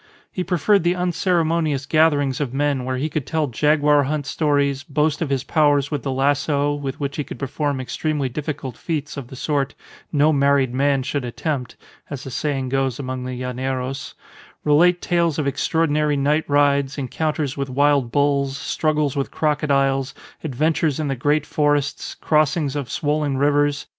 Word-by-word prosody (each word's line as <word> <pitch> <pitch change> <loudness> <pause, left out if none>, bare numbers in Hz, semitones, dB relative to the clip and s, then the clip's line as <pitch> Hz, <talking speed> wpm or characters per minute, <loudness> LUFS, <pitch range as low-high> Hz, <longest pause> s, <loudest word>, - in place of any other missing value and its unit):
He 185 - -3
preferred 190 +3 +2
the 175 +1 +2
unceremonious 170 -5 0
gatherings 145 -3 +2
of 135 -3 -3
men 140 -2 0
where 130 0 -2
he 140 +4 -1
could 155 -4 -3
tell 160 -2 0
jaguar 150 +2 +3
hunt 145 0 -2
stories, 145 -2 +1
boast 150 +1 0
of 160 - -1
his 135 -2 0
powers 145 -2 +2
with 145 -3 -2
the 135 - -3
lasso, 145 +2 +1
with 145 -1 -5
which 140 -1 -3
he 150 - -1
could - - -8
perform 140 0 -2
extremely 145 +2 -2
difficult 140 -1 -5
feats 155 -1 -4
of 140 -4 -6
the 130 - -10
sort 140 0 -1 0.4
"no 150 +1 +3
married 140 -2 +2
man 135 0 +2
should 140 +1 -2
attempt," 125 0 -3 0.3
as 140 -2 -6
the 135 - -7
saying 135 -1 -2
goes 135 -2 0
amongst 130 -2 -4
the 125 0 -5
llaneros; 130 +1 -4 0.5
relate 175 +4 +4
tales 170 -3 +1
of 150 - -1
extraordinary 150 0 +1
night 145 +3 +1
rides, 140 -1 +2
encounters 145 +1 -2
with 140 -1 -3
wild 140 -2 +2
bulls, 140 -1 +1
struggles 150 -1 0
with 140 -1 -1
crocodiles, 140 -3 0 0.3
adventures 155 +1 0
in 150 -2 -1
the 135 - -1
great 145 +4 +1
forests, 145 -1 0
crossings 150 -2 +1
of 140 -5 -3
swollen 150 -2 -1
rivers. 145 +1 +2
145 Hz, 165 wpm, -21 LUFS, 135-150 Hz, 0.5 s, relate